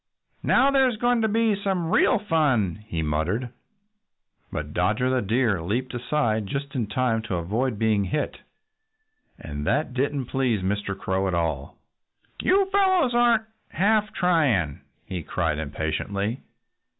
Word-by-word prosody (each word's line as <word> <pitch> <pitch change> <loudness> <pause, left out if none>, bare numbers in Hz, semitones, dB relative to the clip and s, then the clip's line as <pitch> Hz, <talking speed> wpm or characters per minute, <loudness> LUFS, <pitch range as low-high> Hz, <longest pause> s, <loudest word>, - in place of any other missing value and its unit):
"Now 275 - +4
there's 265 -4 +3
going 240 +1 +2
to 220 - +2
be 220 0 +2
some 190 -4 -2
real - - +4
fun," 140 - +1
he 85 -6 -2
muttered. 80 +11 -1 1.0
But 75 0 -5
Dodger 110 +8 +1
the 130 -1 +1
Deer 110 -3 +1
leaped 120 +10 -2
aside 120 -4 0
just 140 +4 -4
in 120 -5 -1
time 115 +1 0
to 110 -4 -4
avoid 110 +8 -1
being 105 -2 +2
hit. 145 +11 -2 1.0
And 75 -1 -6
that 150 -4 0
didn't 135 +1 -1
please 120 -6 0
Mr. 100 0 -2
Crow 95 0 -1
at 95 - -1
all. 80 -5 -2 0.6
"You 390 +1 +3
fellows 375 -9 +3
aren't 240 -2 +4 0.3
half 210 +4 +2
trying," 145 - +1 0.2
he 90 -2 -4
cried 80 -1 -1
impatiently. 90 - -3
120 Hz, 140 wpm, -25 LUFS, -, 1.0 s, Now